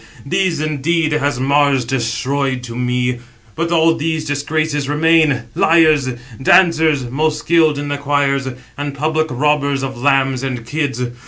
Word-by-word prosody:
These 180 +1 0
indeed 155 +2 0
has 145 -4 0
Mars 140 -1 +2
destroyed 130 +2 -2
to 115 -2 -8
me; 125 0 -1 0.3
but 170 +1 -3
all 165 -1 +4
these 160 0 -2
disgraces 145 0 -2
remain, 155 -4 +2
liars, 155 -3 +3 0.3
dancers, 160 -2 +4
785 120 0 -7
most 155 +2 0
skilled 155 -1 +2
in 145 0 -4
the 145 0 -3
choirs, 140 -1 0 0.3
and 145 -1 -4
public 155 +2 0
robbers 140 0 0
of 130 -2 -5
lambs 135 -2 +2
and 125 -4 -4
kids. 140 -2 -2
145 Hz, 145 wpm, -17 LUFS, 135-155 Hz, 0.3 s, all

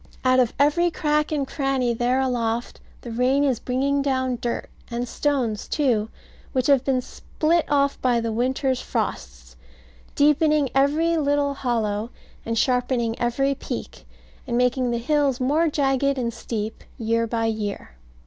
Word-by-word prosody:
Out 255 0 +5
of 245 -3 +2
every 315 +5 +3
crack 300 -2 0
and 285 -3 -1
cranny 270 -4 0
there 245 +3 +1
aloft, 240 -3 -1 0.2
the 240 - -7
rain 255 +4 +2
is 265 -5 +1
bringing 275 +3 0
down 260 -3 0
dirt, 240 - -2 0.2
and 240 +1 -3
stones 245 -7 -1
too, 235 -7 +1 0.4
which 255 -2 +1
have 275 -2 +4
been 260 -2 0
split 325 +6 -1
off 280 -1 +1
by 245 -2 +2
the 230 -1 -2
winter's 260 +3 0
frosts, - - -4 0.6
deepening 300 -1 +3
every 305 +5 +2
little 285 -1 +1
hollow, 230 -5 -1 0.3
and 230 0 -2
sharpening 245 -1 +1
every 270 +4 +1
peak, 275 - -7 0.4
and 240 -1 -1
making 250 0 +2
the 235 - 0
hills 275 +1 +1
more 295 +6 +2
jagged 275 -2 +1
and 235 -2 -2
steep 220 -1 -5
year 230 -1 0
by 225 0 -1
year. 215 - -3
255 Hz, 150 wpm, -23 LUFS, 235-280 Hz, 0.6 s, Out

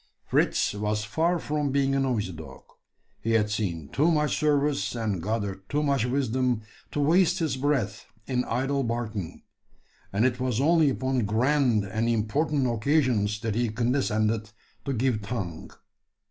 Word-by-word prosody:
Fritz - - +1
was 105 +1 -1
far 165 - +1
from 150 -2 -1
being 135 0 +1
a 135 - +2
noisy 120 -8 0
dog. 80 -2 -10 0.6
He 115 - 0
had 105 -2 +2
seen 85 -9 -2
too 155 +5 +2
much 150 -2 +2
service, 145 -3 +1
and 105 -6 -2
gathered 100 -1 -3
too 150 +1 0
much 140 -5 +1
wisdom, 125 -2 0 0.3
to - - -3
waste 165 +5 +3
his 155 -6 0
breath 130 -7 -1 0.2
in 125 -2 0
idle 135 +4 0
barking; 115 -6 -4 0.7
and 105 +5 +2
it 130 -1 +1
was 125 -3 0
only 160 +1 +4
upon 130 -4 -1
grand 120 0 +2
and 110 +4 -1
important 135 +6 +1
occasions 120 -4 +1
that 115 -2 -1
he 120 +1 0
condescended 110 -2 0 0.4
to 140 - -1
give 120 -2 0
tongue. 100 -7 -5
120 Hz, 150 wpm, -27 LUFS, 105-140 Hz, 0.7 s, only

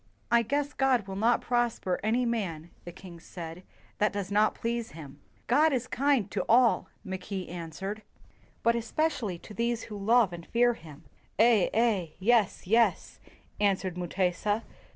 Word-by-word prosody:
"I 235 0 +5
guess 285 +5 -1
God 260 -5 +2
will 195 -1 -6
not 230 +4 +2
prosper 240 -7 0
any 235 +4 +1
man," 175 -9 -3
the 175 - -7
king 175 -1 -12
said, 165 0 -8 0.4
"that 210 - +3
does 200 -1 -4
not 210 +1 +3
please 235 0 -3
him." 145 -3 -11 0.3
"God 305 +6 +4
is 255 -2 0
kind 260 -7 +1
to 190 -1 -1
all," 240 0 +4
Mackay 190 0 -5
answered, 180 +5 -6 0.6
"but 235 - +4
especially 235 - -1
to 210 - -12
these 235 +2 -1
who 215 - -8
love 225 -3 +4
and 170 -1 -9
fear 240 +1 +3
him. 155 -9 -13
' - - -35
' - - -40
"Eh, 220 -3 +5
Eh" 220 -6 +1
["Yes, 215 0 +2
Yes"] 230 +5 +2 0.4
answered 195 -3 +1
Mu 180 -1 -4
tesa. 195 +5 0
210 Hz, 165 wpm, -29 LUFS, 180-235 Hz, 0.6 s, I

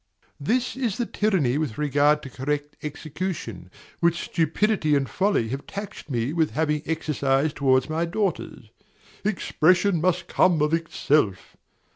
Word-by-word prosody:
This 250 - 0
is 245 -7 -1
the 240 - 0
tyranny 175 - +1
with 145 -9 -3
regard 150 +1 +2
to 135 - -7
correct 145 +3 -3
execution, 150 - -5 0.3
which 170 0 +2
stupidity 165 0 +1
and 135 -1 +1
folly 190 - +1
have 135 +3 -5
taxed 200 -4 -7
me 120 +2 -1
with 160 -2 +2
having 150 -1 +1
exercised 150 -2 0
towards 130 -2 +3
my 160 +2 -1
daughters. 190 +2 -3 0.5
"Expression 185 -2 +2
must 180 +1 +1
come 180 -3 +3
of 150 +1 +1
itself!" 150 - 0
155 Hz, 135 wpm, -25 LUFS, 140-185 Hz, 0.5 s, towards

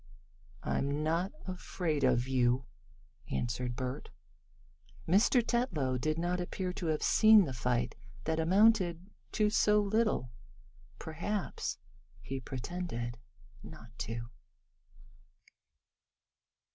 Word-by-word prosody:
"I'm 140 +2 -1
not 170 +5 0
afraid 180 -5 -2
of 125 -1 +3
you," 125 -1 +2 0.6
answered 120 0 -2
Bert. 130 +3 -4 1.0
Mr. 220 +7 +4
Tetlow 155 - 0
did 155 +4 0
not 175 +2 -1
appear 180 +1 -3
to 185 -3 -4
have 155 -1 0
seen 215 -3 +7
the 135 - -4
fight 120 -1 0 0.3
that 160 0 -1
amounted 185 0 +3 0.2
to 210 -1 +2
so 210 -1 +4
little. 210 - +1 0.7
Perhaps 175 +5 -3 0.4
he 135 0 -5
pretended 125 -3 -5 0.4
not 115 +1 -12
to. 115 +1 -5
160 Hz, 95 wpm, -32 LUFS, 125-190 Hz, 1.0 s, seen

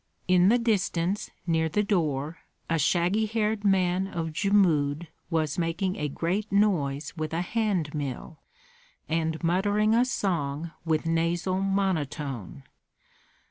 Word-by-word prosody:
In 180 +1 +5
the 240 - +5
distance, 200 -5 0 0.2
near 160 -2 +1
the 210 +6 +1
door, 160 -6 -1 0.3
a 165 -1 0
shaggy 180 +7 +2
haired 215 -1 -1
man 190 -1 +2
of 165 -4 -4
Jmud 170 -6 +2 0.2
was 155 -2 0
making 170 +3 -1
a 150 - -2
great 185 +9 -2
noise 160 -9 +1
with 155 -1 -4
a 165 - 0
hand 195 -7 -1
mill, 145 +1 -5 0.7
and 160 0 -1
muttering 205 +5 +2
a 235 +2 +5
song 170 - -2
with 160 -2 0
nasal 170 +3 0
monotone. 150 - -2
170 Hz, 125 wpm, -27 LUFS, 155-200 Hz, 0.7 s, In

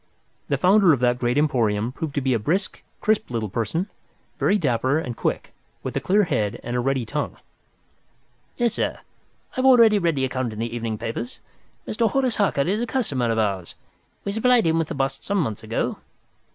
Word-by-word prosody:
The - - +1
founder 185 -2 +5
of 135 - 0
that 125 0 +2
great 120 +1 0
emporium 115 -7 +1
proved 145 +2 -5
to 140 - +1
be 130 -1 +1
a 115 - +1
brisk, 185 - -1 0.2
crisp 215 -1 +1
little 115 -3 -2
person, 115 - -1 0.5
very 205 - +3
dapper 130 - +1
and 125 -7 -3
quick, - - -2 0.3
with - - -4
a - - +2
clear 205 +3 +3
head 110 - -1
and 120 +1 -3
a - - +1
ready 130 -1 0
tongue. 145 +6 -3 1.2
"Yes, 240 -2 +1
sir, - - -1 0.5
I - - -20
have 260 - +1
already 230 -5 +7
read 170 -4 +1
the 135 -1 +1
account 130 -3 -2
in - - -9
the 115 +1 -3
evening 115 -2 -3
papers. 115 +2 -5 0.5
Mr. 225 0 +1
Horace 260 -3 0
Harker 200 -8 +2
is 195 +10 0
a 240 - -1
customer 145 - 0
of 115 - 0
ours. 100 -5 -1 0.5
We 200 - -1
supplied 235 +1 +3
him 165 0 +2
with 165 - 0
the - - -5
bust 135 -1 -2
some 200 - -1
months 120 - -1
ago. - - -2
135 Hz, 200 wpm, -23 LUFS, -, 1.2 s, already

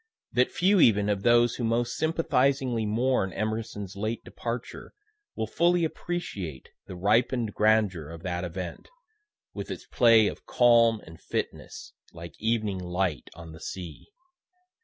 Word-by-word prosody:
that 125 +1 +2
few 190 +2 +3
even 105 -8 +5
of 100 -2 0
those 120 +2 +4
who 125 - -3
most 120 +2 0
sympathizingly 135 -7 +1
mourn 115 -2 +1
Emerson's 110 -2 -4
late 110 +3 -3
departure 120 0 -6 0.4
will 110 - -2
fully 170 +8 +2
appreciate 105 - -5 0.2
the 95 - -7
ripen'd 110 +4 +1
grandeur 105 -8 +2
of 85 0 -10
that 90 -1 -3
event, 90 0 -6 0.6
with - - -6
its - - -6
play 115 -3 +5
of - - -4
calm 115 -2 +4
and 80 0 -13
fitness, - - -5 0.2
like 85 -2 -9
evening 110 -3 0
light 90 -5 -2
on 85 -1 -10
the 80 - -11
sea. 90 -6 -8
110 Hz, 140 wpm, -27 LUFS, 95-120 Hz, 0.6 s, even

